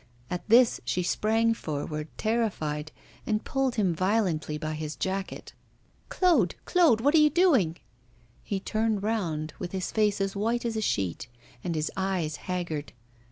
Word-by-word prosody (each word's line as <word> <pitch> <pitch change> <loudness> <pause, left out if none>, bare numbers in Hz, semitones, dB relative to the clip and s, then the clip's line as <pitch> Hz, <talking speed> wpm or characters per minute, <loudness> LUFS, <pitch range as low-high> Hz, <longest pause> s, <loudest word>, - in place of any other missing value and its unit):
At 180 +4 -4
this 240 +2 +5
she 180 - -1
sprang 225 +5 +2
forward, 150 -4 -4
terrified, 160 -10 -1 0.4
and 215 0 0
pulled 270 -2 0
him 195 -6 +2
violently 185 -4 0
by 155 0 -3
his 155 0 -4
jacket. 190 0 -4 0.6
'Claude! 320 - +3
Claude! 320 -11 +4
what 285 +4 +3
are 320 - +6
you 300 0 +6
doing?' 270 - +3 0.6
He 200 - -3
turned 215 0 -1
round, 165 -9 -1
with 180 0 -5
his 190 -1 -2
face 210 -2 +2
as 195 0 -1
white 230 +4 0
as 230 -1 -1
a 220 - -1
sheet 95 - -1 0.4
and 170 -2 -2
his 155 0 -1
eyes 185 -6 -1
haggard. 170 -5 -4
195 Hz, 155 wpm, -28 LUFS, 160-225 Hz, 0.6 s, are